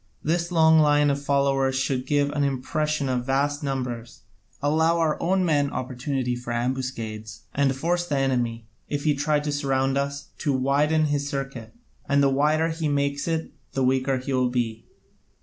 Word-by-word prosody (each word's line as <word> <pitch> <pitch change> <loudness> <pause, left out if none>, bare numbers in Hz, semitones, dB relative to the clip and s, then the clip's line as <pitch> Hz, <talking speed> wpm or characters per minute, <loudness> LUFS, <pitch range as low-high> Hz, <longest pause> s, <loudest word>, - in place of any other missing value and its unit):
This 170 +2 0
long 160 -1 +5
line 145 -1 +4
of 140 0 -2
followers 140 -1 +1
should 130 -1 -1
give 145 -1 +2
an 145 -1 0
impression 140 +2 -1
of 125 -1 -1
vast 145 +2 +1
numbers, 125 -4 -4 0.4
allow 160 +3 +2
our 160 -2 +2
own 185 +1 +2
men 145 -4 +2
opportunity 130 0 -2
for 120 0 -6
ambuscades, 120 -3 -3
and 135 -1 +2
force 175 +5 -1
the 145 - 0
enemy, 120 -4 0 0.2
if 145 -1 -2
he 150 - +3
try 150 +1 +1
to 150 0 -2
surround 135 -1 0
us, 140 0 -4
to 145 -4 0
widen 145 +4 +2
his 145 -1 -1
circuit, 135 - -5 0.3
and 140 0 +4
the 140 - +4
wider 150 +4 +2
he 160 -1 -2
makes 140 0 0
it 160 -1 -2 0.2
the 135 - 0
weaker 130 +1 +2
he 130 +2 -4
will 130 -1 +2
be. 115 -3 -2
140 Hz, 170 wpm, -25 LUFS, 130-150 Hz, 0.4 s, long